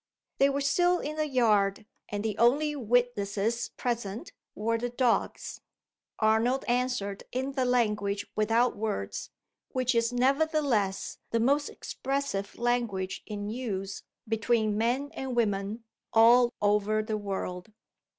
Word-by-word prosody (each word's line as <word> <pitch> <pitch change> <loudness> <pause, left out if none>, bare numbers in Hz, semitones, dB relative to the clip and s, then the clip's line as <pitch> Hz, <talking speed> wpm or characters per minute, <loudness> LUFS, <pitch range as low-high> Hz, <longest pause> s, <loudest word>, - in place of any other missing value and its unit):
They 275 - +5
were 280 0 -1
still 355 +5 +3
in 305 -2 -4
the 310 0 0
yard; 215 -7 +2 0.2
and 205 +1 -3
the 215 -2 -1
only 290 +6 +3
witnesses 235 -3 0
present 235 -4 -3 0.2
were 230 +2 0
the 245 +1 -2
dogs. 245 -1 0 0.6
Arnold 225 +5 +2
answered 245 -5 -1
in 260 +2 -2
the 265 -2 0
language 210 -5 +1
without 225 +3 +2
words 215 -1 -3 0.4
which 255 -1 0
is 230 0 +2
nevertheless 265 - +1
the 230 - +1
most 280 +5 +2
expressive 270 -7 -3
language 235 -6 -1
in 205 -1 -5
use, 200 -5 -4 0.3
between 220 -1 +1
men 245 +6 0
and 265 -2 -4
women, 210 -1 0 0.3
all 235 +2 +6
over 210 +1 +2
the 215 0 -2
world. 195 -1 -4
230 Hz, 125 wpm, -29 LUFS, 210-255 Hz, 0.6 s, all